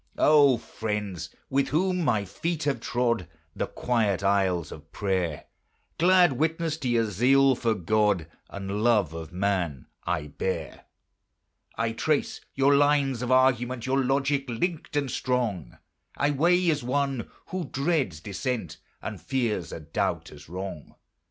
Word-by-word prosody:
O 145 -4 +6
friends! 105 -5 -4 0.2
with 140 +1 +1
whom 180 +4 +1
my 110 -8 +1
feet 160 - -3
have 140 -4 0
trod 115 -6 0 0.3
The - - -2
quiet 110 -6 0
aisles 95 -4 +1
of 80 0 -11
prayer, 95 -6 -1 0.5
Glad 175 -2 +5
witness 160 +3 0
to 135 -6 -3
your 115 -1 +2
zeal 130 +7 +4
for 115 -2 0
God 105 -2 +1 0.2
And 100 +1 -4
love 105 -9 +3
of 80 -1 -7
man 90 -7 -1 0.2
I 85 -4 -1
bear. 75 +6 -4 0.9
I 115 0 0
trace 145 +6 -1
your 135 +1 +4
lines 140 -3 +3
of 125 0 -2
argument; 130 -1 +2
Your 135 +1 +1
logic 135 +1 0
linked 155 +7 -3
and 140 -3 0
strong 115 - -2 0.4
I 145 +1 +2
weigh 175 +4 +3
as 150 -3 -2
one 135 -1 -1 0.2
who 185 -2 -3
dreads 135 - -1
dissent, 105 - -4 0.2
And - - -5
fears 115 -10 -1
a - - -6
doubt 80 +1 -2
as 75 0 -13
wrong. 90 -3 -7
120 Hz, 140 wpm, -27 LUFS, 95-140 Hz, 0.9 s, O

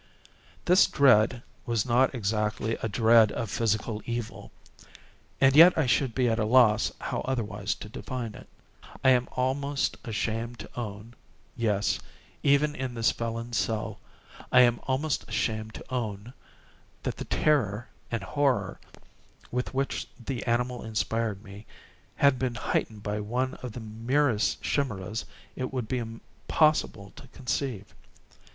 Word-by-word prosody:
This 180 +2 +6
dread 125 -3 +4 0.2
was 115 -3 +1
not 130 +2 +3
exactly 110 0 -1
a 110 - -1
dread 110 0 +5
of 115 -4 -3
physical 110 -1 -1
evil—and 120 - -4
yet 170 +4 +9
I 160 - +3
should 125 -1 +1
be 130 -2 +2
at 115 -1 +1
a - - +2
loss 110 -1 +4
how - - -3
otherwise 105 -5 -2
to - - -9
define 120 0 -5
it. - - -13 0.5
I 130 - +6
am 125 -1 +2
almost 140 +2 -1
ashamed 115 +1 -3
to - - -9
own—yes, 105 -1 -3 0.4
even 145 +1 +3
in 130 -3 -4
this 115 -1 +2
felon's 115 0 -4
cell, 110 -1 -2 0.5
I 125 - +7
am 120 -1 +4
almost 135 +3 -1
ashamed 110 -1 -2
to - - -10
own—that 110 -1 -7
the - - -5
terror 120 -6 +1 0.2
and 115 -4 -3
horror 140 +4 0 0.7
with 125 +1 -2
which 135 +1 -1 0.2
the 130 -4 -3
animal 120 +1 0
inspired 110 -1 -2
me, 100 +1 -12 0.5
had 140 -3 +4
been 125 -2 -1
heightened 110 -2 -2
by 105 +1 -2
one 125 +5 -1
of 125 -4 -6
the 125 - -6
merest 115 +2 0
chimaeras 110 -6 -2 0.3
it 130 -1 -3
would 125 -4 -3
be 125 +2 -1 0.5
possible 130 -10 +2
to 135 - -12
conceive. 125 -5 -4
120 Hz, 135 wpm, -28 LUFS, 110-130 Hz, 0.7 s, yet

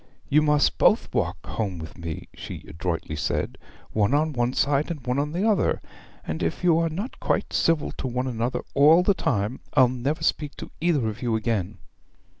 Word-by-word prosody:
'You 150 +2 +5
must 150 -1 +2
both - - +3
walk - - -1
home 100 -5 -3
with 80 0 -8
me,' 85 -2 -6
she - - -8
adroitly 85 -1 -3
said, 75 -2 -2 0.3
'one 110 +5 +2
on 155 +1 +1
one 120 -1 +1
side, 140 +3 +1
and 150 -7 -5
one 125 +2 0
on 145 +1 -1
the 185 +7 0
other. 210 -4 +2 0.5
And 80 - -4
if 85 - -2
you 170 -2 +5
are 165 0 +1
not 195 - -5
quite - - -1
civil 165 -2 +2
to - - -2
one 125 +1 -2
another 120 0 -1
all 155 +5 +6
the 200 - +4
time, 125 - -1 0.2
I'll 130 -2 +6
never 130 +5 -2
speak 150 -2 0
to - - -9
either 155 -9 +2
of 110 - -5
you 120 -2 0
again.' 110 -4 -1
130 Hz, 195 wpm, -25 LUFS, 110-155 Hz, 0.5 s, all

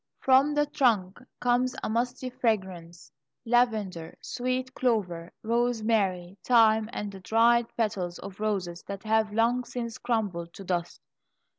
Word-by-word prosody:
From 270 +3 +4
the 295 0 +3
trunk 235 -10 +1 0.2
comes 245 +1 +1
a - - -1
musty 245 +3 -2
fragrance 185 - -3 0.3
lavender, 220 -8 0
sweet 255 +1 -3
clover, 185 -10 -1
rosemary, 220 -6 0
thyme, 220 -2 +4
and 205 -3 -4
the 195 - -10
dried 230 +4 +3
petals 190 -6 -1
of 195 0 -10
roses 190 -5 -2
that 200 -1 -6
have 220 -1 +1
long 230 +3 +2
since 235 -2 -6
crumbled 200 -8 -2
to 195 - -9
dust. 175 -2 -3
220 Hz, 130 wpm, -28 LUFS, 190-245 Hz, 0.3 s, From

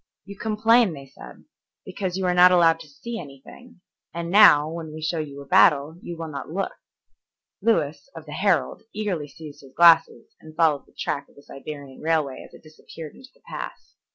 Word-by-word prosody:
"You 200 +1 -10
complain," 220 0 +2
they 140 -2 -10
said, 135 - -14 0.4
"because 190 -1 -4
you 190 - -2
are 180 - +2
not 180 +1 +7
allowed 165 -2 +4
to 165 - -12
see 225 +11 -7
anything, 175 - -14 0.3
and 170 0 -4
now, 155 -8 +7
when 160 -1 -7
we 155 - -8
show 160 +1 -2
you 140 -2 -6
a - - -11
battle, 160 -2 +3
you 170 - -8
will 165 0 -6
not 140 - -7
look." 195 +5 -3 0.9
Lewis, 155 -9 0
of 160 -1 -10
the 150 - -11
Herald, 175 -6 0
eagerly 195 -8 -3
seized 150 +1 -12
his 135 -2 -17
glasses 165 -1 +4
and 155 0 -14
followed 155 -4 +1
the - - -27
track 140 - -3
of - - -25
the 140 - -17
Siberian 140 -1 -10
railway 155 -4 -1
as - - -16
it - - -16
disappeared 155 0 -12
into 260 - -16
the - - -31
pass. - - -8
165 Hz, 195 wpm, -23 LUFS, 145-185 Hz, 0.9 s, not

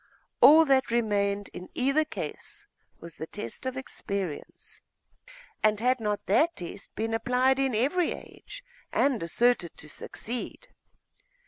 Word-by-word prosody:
All 320 +2 +9
that 270 -3 +3
remained 205 -3 0
in 180 - -8
either 275 +4 +2
case 415 +6 -6 0.3
was 170 -2 -11
the 160 - -6
test 210 +7 -6
of 260 0 -3
experience.... 200 - -6 0.8
And 215 -1 +3
had 250 +2 +2
not 210 -2 -2
that 315 - +3
test 180 +2 -8
been 225 +1 -2
applied 250 +3 +2
in 265 -4 +1
every 295 +10 +1
age, - - -11 0.3
and 270 -6 +2
asserted 175 +2 +2
to 150 - -7
succeed? 245 - -6
235 Hz, 130 wpm, -28 LUFS, 205-270 Hz, 0.8 s, All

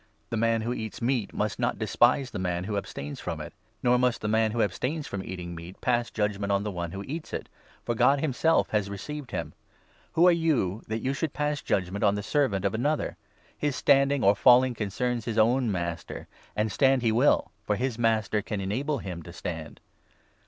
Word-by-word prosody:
The - - 0
man 115 0 +2
3 - - -5
who 120 - 0
eats 110 -3 -5
meat 120 -3 0
must 105 +1 -2
not 120 0 0
despise 120 +4 +2
the - - -4
man 90 -1 -1
who 105 +2 -3
abstains 75 -7 -5
from - - -4
it; - - -7 0.3
nor 125 0 +4
must 125 -1 +1
the 105 - -2
man 110 +1 +3
who 115 +1 +1
abstains 135 - -2
from 100 -1 -5
eating 90 -2 -6
meat 85 +2 -9
pass 120 -1 +1
judgement 105 -2 -1
on 100 0 +2
the 105 - -3
one 85 -2 -4
who 95 +2 -5
eats 155 +8 -6
it, - - -4 0.4
for 120 - 0
God 140 +5 +4
himself 160 +3 +2
has 105 -2 0
received 130 +8 -6
him. 80 -4 -4 0.6
Who 170 +2 +5
are - - +8
you, 145 - +1
that 110 +1 -3
you 135 - 0
should 150 +1 -2
pass 150 -1 -1
judgement 95 +1 -1
on 100 -1 +4
the 105 - -3
4 - - -9
servant 110 -10 +2
of 100 - +1
another? 145 +7 0 0.4
His 145 -2 -1
standing 140 -1 +3
or 100 +1 +5
falling 125 +4 +6
concerns 120 +2 -2
his 115 -2 -3
own 120 +1 +3
master. 85 -2 -4 0.3
And 105 0 0
stand 135 -2 +3
he 115 - +3
will, 120 +6 +3 0.2
for 105 - +2
his 125 0 -2
Master 110 -2 +2
can 105 0 -4
enable 130 +10 -1
him 90 -7 -6
to 85 - -10
stand. 80 -2 -6
110 Hz, 210 wpm, -27 LUFS, 100-130 Hz, 0.6 s, are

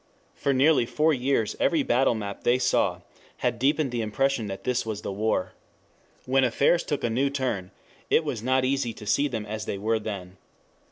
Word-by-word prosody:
For 140 - -1
nearly 135 -2 +4
four 155 +4 +2
years 125 -4 0
every 160 -4 +2
battle 125 -1 +2
map 100 -2 -6
they 120 +1 +3
saw 130 - +1 0.4
had 115 - -1
deepened 140 +1 +1
the 120 -1 -1
impression 115 +2 0
that 95 -1 -6
this 125 0 0
was 110 -2 -5
the - - -3
war. 100 -2 -1 0.7
When 135 +1 +3
affairs 140 +7 +3
took 145 - -3
a 120 - +1
new 135 +5 +1
turn, 125 -10 -2 0.4
it 160 - +4
was 130 -8 -3
not 130 +2 +2
easy 130 -3 0
to 105 - -11
see 140 +7 +2
them 115 -6 -4
as 110 0 -5
they - - -2
were 110 +3 0
then. 95 -4 -6
120 Hz, 190 wpm, -26 LUFS, 110-135 Hz, 0.7 s, nearly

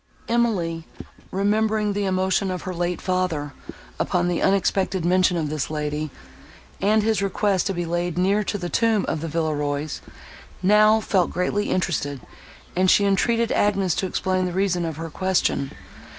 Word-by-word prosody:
Emily, 190 -9 0 0.4
remembering 210 +1 +1
the 200 0 -1
emotion 190 +1 +1
of 185 -1 -4
her 185 - -4
late 175 0 -2
father, 180 -6 -1 0.5
upon 175 -1 +1
the 175 -1 -1
unexpected 190 -2 +1
mention 180 0 +3
of 155 -3 -2
this 155 -3 -2
lady, 150 0 -3 0.7
and 210 +2 +3
his 220 -2 +1
request 195 -1 +1
to 195 - -1
be 175 0 -2
laid 175 0 -2
near 195 +3 +2
to 205 - -2
the 175 -3 -4
tomb 225 +1 +2
of 155 - -2
the 165 - -3
Villerois, 150 -2 -2 0.6
now 215 +3 +5
felt 185 -5 +1
greatly 205 +4 -1
interested, 145 -6 -1 0.6
and 185 +1 +3
she 200 - +5
entreated 230 +4 +2
Agnes 195 -4 +2
to 190 - -1
explain 185 0 0
the 180 - -4
reason 180 -2 0
of 160 -2 -4
her 165 0 -6
question. 185 -7 0
185 Hz, 160 wpm, -23 LUFS, 165-200 Hz, 0.7 s, now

